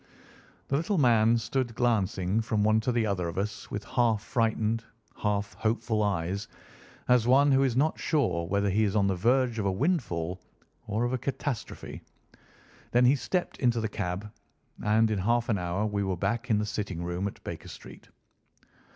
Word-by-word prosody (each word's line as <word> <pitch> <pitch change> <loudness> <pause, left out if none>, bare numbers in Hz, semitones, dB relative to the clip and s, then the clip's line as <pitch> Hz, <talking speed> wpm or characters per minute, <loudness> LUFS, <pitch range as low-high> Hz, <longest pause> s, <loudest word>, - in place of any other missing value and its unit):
The 140 - +2
little 185 +6 0
man 115 -4 +4
stood 120 -1 -2
glancing 105 -4 +1
from 110 -2 0
one 110 +1 +4
to 120 +3 -1
the 115 -2 +1
other 95 -4 -1
of 85 - -6
us 100 +2 -3
with 105 - -4
half 115 -3 +1
frightened, 115 -1 0 0.3
half 105 -1 -1
hopeful 110 0 0
eyes, 100 0 -1 0.6
as 125 -2 +4
one 140 +3 +5
who 135 0 +4
is 130 -4 +1
not 155 +4 +2
sure 90 - 0
whether 100 +2 +1
he 110 +3 +2
is 105 -1 0
on 100 -2 +3
the 95 -1 +1
verge 120 +4 +2
of 105 - -1
a - - +2
windfall 95 - -1 0.5
or 105 +3 -1
of 120 +1 0
a 130 - -1
catastrophe. 140 -2 -4 0.9
Then 120 +1 +4
he 130 +3 +5
stepped 175 +7 -2
into 120 -3 +2
the 110 - -1
cab, 100 0 -4 0.5
and 110 +1 +3
in 105 - 0
half 120 +5 +1
an 105 -4 +1
hour 90 +4 -1
we 105 -1 -1
were 95 -2 -1
back 115 +7 -2
in 110 - +3
the 105 - 0
sitting 100 -5 -4
room 90 +3 -2
at 100 - -9
Baker - - -7
Street. - - -12
110 Hz, 185 wpm, -28 LUFS, 100-120 Hz, 0.9 s, one